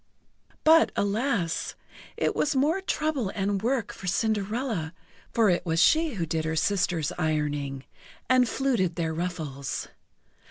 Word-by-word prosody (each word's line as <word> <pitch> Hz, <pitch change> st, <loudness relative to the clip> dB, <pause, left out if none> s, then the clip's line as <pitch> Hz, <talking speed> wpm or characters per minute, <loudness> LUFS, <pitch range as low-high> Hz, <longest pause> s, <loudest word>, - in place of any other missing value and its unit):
But, 320 Hz, +1 st, +6 dB
alas! 205 Hz, -4 st, 0 dB, 0.4 s
it -, -, 0 dB
was 300 Hz, -1 st, +1 dB
more 300 Hz, +8 st, +2 dB
trouble 300 Hz, -, -1 dB
and 195 Hz, -1 st, 0 dB
work 240 Hz, 0 st, -1 dB
for 195 Hz, -, -9 dB
Cinderella, 210 Hz, -3 st, -1 dB, 0.4 s
for 225 Hz, -4 st, +4 dB
it 175 Hz, -, 0 dB
was 165 Hz, -1 st, 0 dB
she 315 Hz, -, +4 dB
who 175 Hz, -4 st, -1 dB
did 160 Hz, 0 st, -1 dB
her 160 Hz, 0 st, -2 dB
sisters' 175 Hz, -3 st, +1 dB
ironing, 145 Hz, -4 st, -1 dB, 0.4 s
and 255 Hz, -2 st, +4 dB
fluted 235 Hz, -11 st, 0 dB
their 165 Hz, -2 st, -1 dB
ruffles. 155 Hz, -5 st, -4 dB
195 Hz, 130 wpm, -27 LUFS, 160-255 Hz, 0.4 s, But